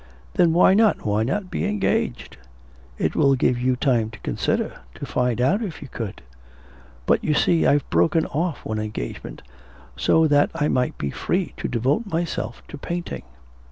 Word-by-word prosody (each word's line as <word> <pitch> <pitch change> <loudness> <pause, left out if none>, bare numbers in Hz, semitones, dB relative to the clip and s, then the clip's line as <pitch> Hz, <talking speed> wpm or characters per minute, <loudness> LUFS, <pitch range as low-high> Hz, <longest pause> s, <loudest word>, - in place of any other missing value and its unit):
'Then 170 -2 +4
why 175 +3 +5
not, 215 +1 +3
why 105 0 +1
not 185 - -2
be - - -2
engaged? 210 - -1 0.6
It - - -1
will 135 -1 +4
give 125 -1 +1
you 130 0 +2
time 120 -4 +1
to 105 -2 -12
consider, - - -2 0.2
to - - -6
find 125 -2 0
out 175 - +2
if 195 -8 -5
you - - -9
could.' 115 -5 -6 0.8
'But, - - +2
you 150 - +1
see, 165 +2 +3
I've 145 -1 +2
broken 165 0 +3
off 165 +1 -2
one 110 0 -2
engagement, 105 - -6 0.5
so 160 - +3
that 145 -1 +4
I 150 -2 +1
might 125 -1 0
be 70 - -3
free - - -2
to - - -3
devote 135 - 0
myself 165 - -3
to 145 - -8
painting.' 175 - -5
145 Hz, 170 wpm, -23 LUFS, 120-175 Hz, 0.8 s, why